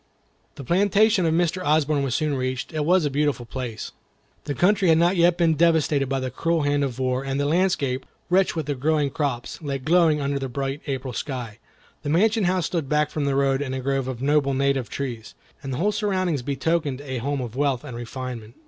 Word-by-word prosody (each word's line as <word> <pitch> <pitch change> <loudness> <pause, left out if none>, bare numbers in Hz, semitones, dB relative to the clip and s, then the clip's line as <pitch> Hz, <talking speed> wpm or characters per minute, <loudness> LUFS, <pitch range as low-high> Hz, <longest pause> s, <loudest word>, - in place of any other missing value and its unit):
The 140 - -8
plantation 200 - +3
of 160 - +2
Mr. 175 +2 0
Osborne 150 -2 +2
was 135 -3 -1
soon 155 -2 0
reached. 130 +2 -3
It 155 -1 -1
was 180 0 +3
a 145 - 0
beautiful 145 -3 0
place. 120 -2 -6 0.5
The 145 - -3
country 190 - +3
had 160 - +6
not 175 +3 +3
yet 170 0 +4
been 170 -2 +3
devastated 155 -4 +2
by 135 0 0
the 130 -1 -3
cruel 165 +4 0
hand 145 0 +1
of 130 -4 -3
war, 130 0 -1
and 135 0 -2
the 145 - +1
landscape, 150 -5 0 0.2
rich 185 +1 +2
with 160 -3 -2
the 145 - -1
growing 145 +1 0
crops, 140 -3 -3
lay 140 -3 -2
glowing 160 +2 +3
under 140 0 -1
the 135 -1 -4
bright 135 +2 -3
April 130 -2 -3
sky. 120 -4 -5 0.4
The 145 - -4
mansion 210 +6 +3
house 180 -2 +1
stood 160 -6 -2
back 150 0 +1
from 150 -2 -2
the 140 -1 0
road 135 0 +2
in 130 -2 -3
a - - -2
grove 135 0 -1
of 130 -1 -5
noble 140 -1 +2
native 135 -2 0
trees, 120 -5 -5 0.3
and 135 -2 -6
the 125 - -2
whole 205 +6 +1
surroundings 190 - 0
betokened 140 +1 -1
a 130 -3 -4
home 140 +3 -2
of 120 -2 -5
wealth 135 -3 0
and 125 - -8
refinement. 120 -1 -7
145 Hz, 215 wpm, -24 LUFS, 130-165 Hz, 0.5 s, had